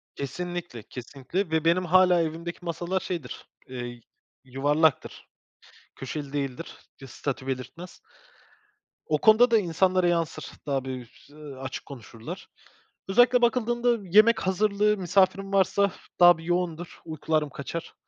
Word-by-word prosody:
Kesinlikle, 175 Hz, -4 st, -5 dB
kesinlikle. 140 Hz, +8 st, -5 dB
Ve 160 Hz, 0 st, 0 dB
benim 180 Hz, +2 st, +3 dB
hâlâ 180 Hz, 0 st, +5 dB
evimdeki 165 Hz, +2 st, -4 dB
masalar 175 Hz, +2 st, -2 dB
şeydir, 170 Hz, -10 st, -6 dB, 0.2 s
eee, 120 Hz, -2 st, -7 dB, 0.4 s
yuvarlaktır, 145 Hz, +4 st, 0 dB, 0.7 s
köşeli 140 Hz, +1 st, -6 dB
değildir, 140 Hz, +2 st, -4 dB, 0.3 s
bir 135 Hz, -, -10 dB
statü 135 Hz, +1 st, -5 dB
belirtmez. 135 Hz, +7 st, -6 dB, 1.1 s
O 155 Hz, -, +1 dB
konuda 220 Hz, +7 st, +5 dB
da 225 Hz, -, +6 dB
insanlara 185 Hz, 0 st, +2 dB
yansır, 170 Hz, -2 st, -1 dB
daha 135 Hz, -2 st, -1 dB
bir, 125 Hz, -3 st, -8 dB
ııı, 145 Hz, -3 st, -11 dB
açık 130 Hz, -, -6 dB
konuşurlar. 125 Hz, -, -9 dB, 0.6 s
Özellikle 245 Hz, +4 st, +5 dB
bakıldığında 240 Hz, -2 st, +1 dB
yemek 215 Hz, +5 st, +6 dB
hazırlığı 210 Hz, +2 st, +2 dB
misafirim 195 Hz, +2 st, +1 dB
varsa 200 Hz, +1 st, +3 dB, 0.3 s
daha 175 Hz, -1 st, +8 dB
bir 165 Hz, -, -11 dB
yoğundur, 175 Hz, -1 st, -2 dB
uykularım 155 Hz, -1 st, -1 dB
kaçar. 140 Hz, +5 st, -7 dB
170 Hz, 120 wpm, -26 LUFS, 140-190 Hz, 1.1 s, daha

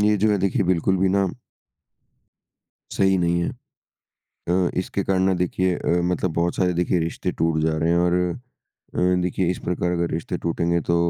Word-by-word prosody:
ये 105 Hz, 0 st, +3 dB
जो 105 Hz, +2 st, +2 dB
है 105 Hz, -, +2 dB
देखिए 100 Hz, +4 st, +1 dB
बिल्कुल 90 Hz, +1 st, +1 dB
भी 95 Hz, +1 st, +2 dB
ना 100 Hz, +1 st, +2 dB, 1.7 s
सही 95 Hz, -1 st, +2 dB
नहीं 85 Hz, 0 st, +1 dB
है। 85 Hz, -, -1 dB, 1.0 s
अ, 90 Hz, 0 st, +2 dB
इसके 95 Hz, +2 st, -3 dB
कारण 95 Hz, -1 st, +1 dB
ना 95 Hz, 0 st, +3 dB
देखिए 90 Hz, +1 st, 0 dB
अ, 85 Hz, 0 st, 0 dB
मतलब 90 Hz, 0 st, 0 dB
बहुत 85 Hz, +1 st, 0 dB
सारे 90 Hz, -2 st, +1 dB
देखिए 90 Hz, 0 st, +1 dB
रिश्ते 80 Hz, +1 st, -2 dB
टूट 80 Hz, -1 st, 0 dB
जा 80 Hz, 0 st, +1 dB
रहे 80 Hz, +1 st, 0 dB
हैं 85 Hz, -, +3 dB
और 85 Hz, 0 st, +2 dB, 0.8 s
अ, -, -, 0 dB, 0.2 s
देखिए 90 Hz, 0 st, -1 dB
इस 90 Hz, -, -4 dB
प्रकार 90 Hz, 0 st, -1 dB
अगर 85 Hz, -1 st, -1 dB
रिश्ते 80 Hz, +1 st, -3 dB
टूटेंगे 85 Hz, 0 st, 0 dB
तो 85 Hz, -, +4 dB
90 Hz, 185 wpm, -23 LUFS, 85-95 Hz, 1.7 s, तो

